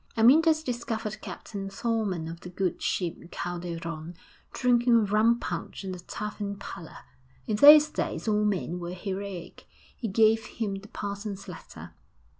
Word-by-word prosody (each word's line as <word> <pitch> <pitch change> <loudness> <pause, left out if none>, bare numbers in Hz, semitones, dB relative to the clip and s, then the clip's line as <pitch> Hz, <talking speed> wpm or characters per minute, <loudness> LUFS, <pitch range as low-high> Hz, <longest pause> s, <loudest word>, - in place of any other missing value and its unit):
VII 225 - 0
Amyntas 315 +5 +6
discovered 225 -4 -3
Captain 195 -2 -6
Thorman 195 -5 -1
of 165 +1 -7
the 180 - -9
good 185 0 -2
ship 170 -1 -2
Calderon 170 -2 -5 0.4
drinking 240 -3 +3
rum 220 +4 +3
punch - - -5
in 190 -1 -4
a 180 - -7
tavern 205 +2 -5
parlour. 170 -4 -9 0.5
In 215 - -1
those 300 +5 +10
days 300 - -3
all 210 -1 +2
men 185 -4 -1
were 175 +1 -5
heroic.... 190 -1 -6 0.3
He 235 - -4
gave 220 +2 +4
him 215 -4 -3
the 195 +1 -7
parson's 200 -1 -5
letter. - - -10
205 Hz, 145 wpm, -28 LUFS, 180-225 Hz, 0.5 s, those